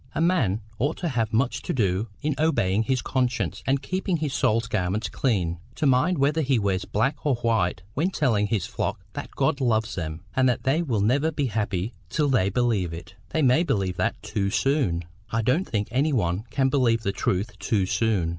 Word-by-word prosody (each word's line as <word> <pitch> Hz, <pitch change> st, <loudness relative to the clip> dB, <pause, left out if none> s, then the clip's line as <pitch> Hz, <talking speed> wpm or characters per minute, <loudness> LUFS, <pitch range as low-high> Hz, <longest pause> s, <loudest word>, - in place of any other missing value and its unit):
A -, -, -1 dB
man 130 Hz, -, +2 dB, 0.2 s
ought 145 Hz, +7 st, 0 dB
to 175 Hz, -, -2 dB
have 115 Hz, -5 st, 0 dB
too 110 Hz, -, +1 dB
much 125 Hz, +1 st, 0 dB
to -, -, -3 dB
do 100 Hz, -3 st, +1 dB, 0.2 s
in 150 Hz, 0 st, +1 dB
obeying 110 Hz, -11 st, +2 dB
his 130 Hz, +2 st, 0 dB
conscience 120 Hz, -8 st, -1 dB
and 135 Hz, +1 st, +1 dB
keeping 185 Hz, +2 st, -1 dB
his 150 Hz, -3 st, -2 dB
soul's 115 Hz, -2 st, +2 dB
garments 100 Hz, -1 st, -1 dB
clean, 90 Hz, -10 st, 0 dB, 0.2 s
to 155 Hz, -, -1 dB
mind 140 Hz, +7 st, +3 dB
whether 145 Hz, +3 st, +2 dB
he 135 Hz, -3 st, +2 dB
wears 100 Hz, -3 st, 0 dB
black 135 Hz, +8 st, -1 dB
or 145 Hz, -4 st, +2 dB
white 110 Hz, -7 st, 0 dB
when 165 Hz, +7 st, +1 dB
telling 115 Hz, -, +1 dB
his 100 Hz, -4 st, 0 dB
flock -, -, -3 dB
that -, -, -6 dB
God 140 Hz, -, +1 dB
loves 110 Hz, -3 st, +1 dB
them, 80 Hz, -1 st, -4 dB
and 130 Hz, -1 st, +4 dB
that 125 Hz, -, -1 dB
they 140 Hz, +5 st, +2 dB
will 120 Hz, -11 st, 0 dB
never 135 Hz, +9 st, +2 dB
be 145 Hz, -2 st, -1 dB
happy 105 Hz, -2 st, -2 dB, 0.2 s
till 150 Hz, +6 st, +1 dB
they 110 Hz, -8 st, +3 dB
believe 100 Hz, -6 st, 0 dB
it." 85 Hz, +3 st, -9 dB, 0.2 s
"They 160 Hz, -, 0 dB
may 130 Hz, +4 st, +5 dB
believe 95 Hz, -, 0 dB
that -, -, 0 dB
too 100 Hz, -1 st, -1 dB
soon." 115 Hz, -, +1 dB, 0.3 s
"I 115 Hz, 0 st, 0 dB
don't 140 Hz, -, +1 dB
think 105 Hz, -2 st, -1 dB
any 140 Hz, +5 st, +1 dB
one 95 Hz, -3 st, 0 dB
can 135 Hz, -1 st, +1 dB
believe 120 Hz, -4 st, +2 dB
the 100 Hz, -, 0 dB
truth 100 Hz, +2 st, -2 dB
too 100 Hz, -1 st, +1 dB
soon." 100 Hz, -4 st, +1 dB
115 Hz, 205 wpm, -25 LUFS, 100-140 Hz, 0.3 s, may